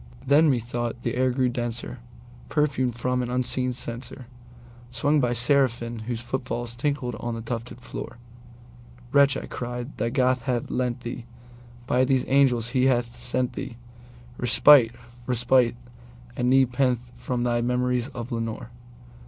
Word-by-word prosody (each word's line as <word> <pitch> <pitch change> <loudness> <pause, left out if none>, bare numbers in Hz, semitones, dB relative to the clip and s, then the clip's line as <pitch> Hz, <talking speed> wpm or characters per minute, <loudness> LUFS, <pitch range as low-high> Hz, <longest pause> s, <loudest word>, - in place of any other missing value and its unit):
Then, 150 +3 +5
methought, 120 -1 -2
the 120 - -1
air 130 +1 +2
grew 130 0 +1
denser, 120 0 -4 0.5
perfumed 135 -5 0
from 125 +1 -1
an 120 - -3
unseen 125 +1 +1
censerSwung 120 +2 -4
by 120 -1 +1
seraphim 120 -2 +1
whose 120 -2 -3
foot 130 +2 -3
falls 120 -1 -4
tinkled 130 -1 -2
on 120 -1 -3
the 115 - -5
tufted 115 +1 -6
floor."Wretch," 120 +3 -3
I - - -5
cried, 120 +2 -6
"thy 115 +2 0
God 130 +1 +2
hath 125 -1 -2
lent 125 -1 -1
thee—by 120 +1 -4
these 130 -1 +1
angels 125 -4 +3
he 130 +1 +2
hath 120 -2 0
sent 125 +1 +1 0.9
theeRespite—respite 120 -1 +4 0.6
and 125 - 0
nepenthe 125 -2 +2
from 125 0 -3
thy 120 -1 +1
memories 125 0 0
of 125 -2 -7
Lenore!" 115 0 -4
120 Hz, 130 wpm, -25 LUFS, 120-125 Hz, 0.9 s, Then